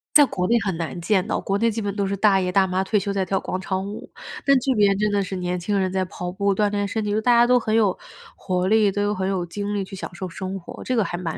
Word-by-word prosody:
在 295 - +9
国 180 -5 -2
内 235 - +4
很 190 -5 -2
难 170 +1 -4
见 185 +1 +1
到， - - -1
国 195 - -1
内 230 +3 +2
基 225 0 -3
本 200 -1 -2
都 200 -1 -1
是 200 - -1
大 200 -1 +4
爷 180 -1 -1
大 190 +1 +3
妈 185 0 -1
退 210 - +1
休 200 0 -1
在 195 -1 -1
跳 195 +2 0
广 185 - -3
场 190 0 -3
舞。 205 +2 -8 0.4
但 275 -1 +5
这 270 0 +1
边 200 -2 +3
真 210 +1 +1
的 205 -1 +1
是 190 0 -4
年 180 0 -2
轻 200 +4 -1
人 190 -1 0
在 190 0 0
跑 180 0 -6
步、 200 +1 0
锻 210 +1 +2
炼 205 -1 -1
身 220 +2 -2
体， 205 0 -1
大 240 +2 +3
家 235 0 +6
都 250 +1 +4
很 220 -2 -1
有 210 -4 +2 0.4
活 180 -1 -1
力， 215 -1 +4
都 205 +1 0
很 190 -1 -2
有 190 -2 -1
精 205 +4 -4
力 200 - -1
去 190 - -12
享 185 -1 -6
受 185 +1 -5
生 190 +3 -5
活， 175 - -10
这 255 - 0
个 225 - +3
还 175 -1 -4
蛮 170 -3 -4
195 Hz, 320 characters per minute, -23 LUFS, 185-210 Hz, 0.4 s, 在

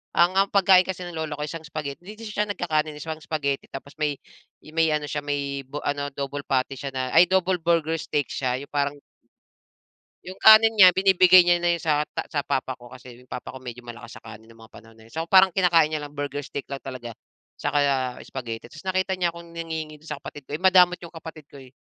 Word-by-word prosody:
ang 175 +2 +4
ang 195 +1 +4
pagkain 190 -2 +5
kasi 185 -1 -4
ng 175 - -10
lola 160 -1 -3
ko, - - -7
isang 160 +2 -7
spaghetti- 155 0 -6
'di 205 - -8
'di 225 - -8
siya 210 0 -1
nagkakanin, 155 -6 -1
eh- - - -10
isang 160 0 -5
spaghetti 140 -3 -2
tapos 140 +1 -9
may, 150 -2 -1 0.5
eh, 155 - -13
may 160 -1 +4
ano 150 -1 -1
siya 150 +2 -3
may 140 -1 -3
bo 145 +2 -6
ano 145 0 -2
double 140 +1 -5
patty 135 +1 0
siya 140 -1 -5
na 130 0 -2
ay 180 - +9
double 185 0 +1
burger 165 -1 +1
steak 145 -1 -2
siya. 130 -1 -2
Yung 140 - -11
parang 145 -1 0 1.3
Yung 185 +1 -9
kanin 220 +1 +8
niya 195 -4 +9
binibigay 185 -1 +6
niya 175 0 +3
na 175 - +1
yun - - -12
sa 150 -2 +2
ta - - -3
sa 145 -3 0
papa 130 -1 -2
ko. 120 0 -14
Kasi 125 -1 -13
yung 125 - -23
papa 125 - -7
ko 130 - -10
medyo 125 -1 -9
malakas 120 0 -10
sa - - -16
kanin 110 0 -12
nung 115 0 -16
mga 110 - -24
panahon 115 0 -15
na 110 - -17
yun. 115 - -19
So, 165 +1 -4
parang 190 -1 +6
kinakain 170 -4 +3
niya 155 - -2
lang 145 0 -9
burger 145 0 -3
steak 140 0 -7
lang 140 -1 -7
talaga, 125 -3 -8 0.5
'tsaka - - -1 0.5
spaghetti. 115 -4 -6
Tas 155 - -12
nakita 185 0 0
niya 180 -2 0
akong 170 0 -12
nanghihingi 160 -2 -5
dun 155 - -13
sa 150 - -4
kapatid 145 0 -10
ko. - - -7
Eh, - - -20
madamot 180 -1 +5
yung 170 -1 -11
kapatid 160 -2 -10
ko, - - -13
eh. 130 - -14
155 Hz, 240 wpm, -24 LUFS, 140-175 Hz, 1.3 s, ay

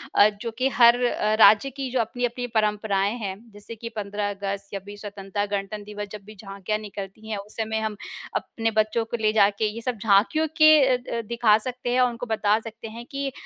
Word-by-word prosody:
अ, 205 - +7
जो 230 - -3
कि 260 +1 +2
हर 240 -1 +6
अ, 215 -3 0
राज्य 215 +5 +7
की 270 0 -5
जो 255 - 0
अपनी-अपनी 245 +2 -3
परंपराएँ 210 -2 +1
हैं, 195 -4 -4 0.2
जैसे 205 +2 -10
कि 230 +1 -7
15 205 0 -3
अगस्त, 200 0 -4
26 200 +1 -7
स्वतंत्रता 205 -1 -4
गणतंत्र 200 +1 -6
दिवस, 210 0 -6
जब 210 -1 -8
भी 215 +1 -12
झाँकियाँ 200 +1 -4
निकलती 205 +1 -8
हैं, 215 - -2
उस 200 +2 -9
समय 220 0 -1
हम 220 -1 -3 0.4
अपने 225 -1 -2
बच्चों 215 +1 +1
को 235 - -4
ले 215 -1 +3
जाके 205 0 +3
ये 230 - -6
सब 245 0 -3
झाँकियों 220 +10 +3
के 310 0 +8
अ 255 -1 +3
अ, 245 -1 -4
दिखा 230 -1 +3
सकते 250 +2 -5
हैं 255 - +2
और 250 - +4
उनको 240 +1 -6
बता 215 -2 +1
सकते 225 0 -9
हैं 230 +2 -9
कि 275 0 -3
215 Hz, 210 wpm, -24 LUFS, 205-235 Hz, 0.4 s, के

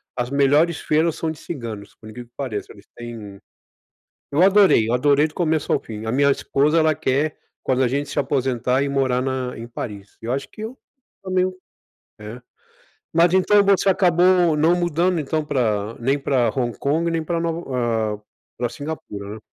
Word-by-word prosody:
as 120 0 -2
melhores 145 +4 +3
feiras 160 +1 +1
são 160 - -2
de 155 - -10
ciganos, 115 -10 -7
por 110 - -15
incrivel 120 +3 -9
que - - -38
que - - -68
pareça, 120 -7 -4
eles 100 - -17
têm 110 -4 -9 0.9
Eu 150 +5 +3
adorei, 190 - +5
eu 120 - +1
adorei 145 +4 +3
do 150 - -19
começo 160 -3 0
ao - - +3
fim, 110 -1 -8
a 110 - -1
minha 140 +2 +3
esposa, 145 +3 +1
ela 155 -1 +3
quer, 145 0 -1 0.3
quando 130 0 +1
a - - +2
gente 140 +3 -2
se - - -3
aposentar, 130 -2 0
ir 140 - -1
morar 135 -2 +1
na 130 -1 -3
em 115 - -7
Paris, 105 -4 -8
e - - -12
eu 120 - -1
acho 135 +1 -3
que 215 - -10
eu 230 +4 -7 0.4
também. 185 -1 +1 0.7
É, 105 +3 -9 0.7
mas 170 +1 +4
então 200 +2 +4
você 200 0 +3
acabou 180 -3 +3
não 160 +3 +4
mudando, 175 0 +1
então 155 +1 -2
pra 115 -6 -1
nem 135 +4 +1
pra 130 -4 +1
Hong 120 -3 -1
Kong, 160 +4 0
nem 165 -1 -1
para 170 +1 -2
Nova 125 -10 -1
eh, - - -30 0.4
para 120 0 -1
Singapura, 110 -7 -7
né? - - -10
140 Hz, 190 wpm, -22 LUFS, 120-165 Hz, 0.9 s, adorei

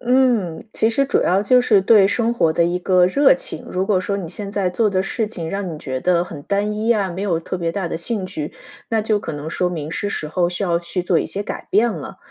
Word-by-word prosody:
嗯， 245 -9 +1
其 220 - +2
实 275 +4 +2
主 - - +2
要 190 +2 +2
就 250 +4 +5
是 210 -5 +4
对 195 0 +6
生 230 +3 0
活 160 -8 +2
的 170 +1 +2
一 175 +1 0
个 180 -1 +4
热 285 - +5
情。 - - -6
如 185 +1 -1
果 195 -3 +2
说 200 +2 -2
你 180 -5 -5
现 200 +3 -6
在 200 -3 0
做 210 +3 +1
的 185 - +1
事 220 +3 -2
情 170 -7 -5
让 195 -3 -3
你 155 - -7
觉 130 -3 -4
得 175 +1 +2
很 150 -5 -9
单 205 +3 -1
一 220 +2 0
啊， 200 -4 0
没 185 +3 -5
有 180 -5 0
特 170 +3 -5
别 170 -1 -1
大 195 -3 -2
的 - - -3
兴 190 +3 -3
趣， 155 -5 -5 0.4
那 225 - +2
就 215 -1 +1
可 - - -5
能 145 +2 -6
说 180 +2 -1
明 155 -4 -4
是 205 +4 -2
时 155 - -3
候 175 +2 +1
需 175 +3 -4
要 170 -2 +1
去 175 +1 -4
做 - - +3
一 - - -2
些 200 - -2
改 - - -6
变 225 +4 +3
了。 160 -8 -7
190 Hz, 290 characters per minute, -20 LUFS, 175-215 Hz, 0.4 s, 对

